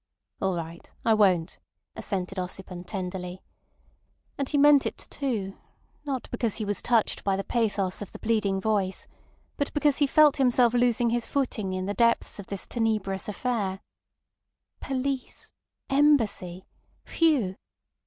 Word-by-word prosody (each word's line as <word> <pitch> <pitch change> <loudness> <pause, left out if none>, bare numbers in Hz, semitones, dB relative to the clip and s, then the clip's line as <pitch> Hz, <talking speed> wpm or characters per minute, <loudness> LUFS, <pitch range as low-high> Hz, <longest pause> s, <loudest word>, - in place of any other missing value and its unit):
"All 190 -2 +1
right. 165 0 -7
I 225 - +5
won't," 185 -6 +2 0.4
assented 190 -1 -3
Ossipon 180 0 -6
tenderly. 180 -2 -5 0.9
And 275 -1 -3
he 290 - +1
meant 285 -1 +6
it - - -5
too, 220 -9 -3 0.5
not 270 -3 -3
because 235 -3 -1
he 220 - -3
was 205 -2 -1
touched 230 -3 +1
by 195 -1 +1
the 195 - -2
pathos 205 -6 -1
of 205 - -6
the - - -9
pleading 215 -4 0
voice, 195 -2 -1 0.5
but 285 - -1
because 295 -2 +3
he 290 - +4
felt 300 0 +5
himself 245 -3 +4
losing 240 -1 +2
his 240 -1 -1
footing 225 -8 -1
in 185 0 -2
the 200 - -2
depths 235 -1 +1
of 200 - -8
this 200 -2 -4
tenebrous 215 -4 -1
affair. 205 -4 -2 1.0
Police! 270 0 -3 0.4
Embassy! 235 -11 +2 0.4
Phew! 275 - +2
215 Hz, 140 wpm, -27 LUFS, 190-255 Hz, 1.0 s, meant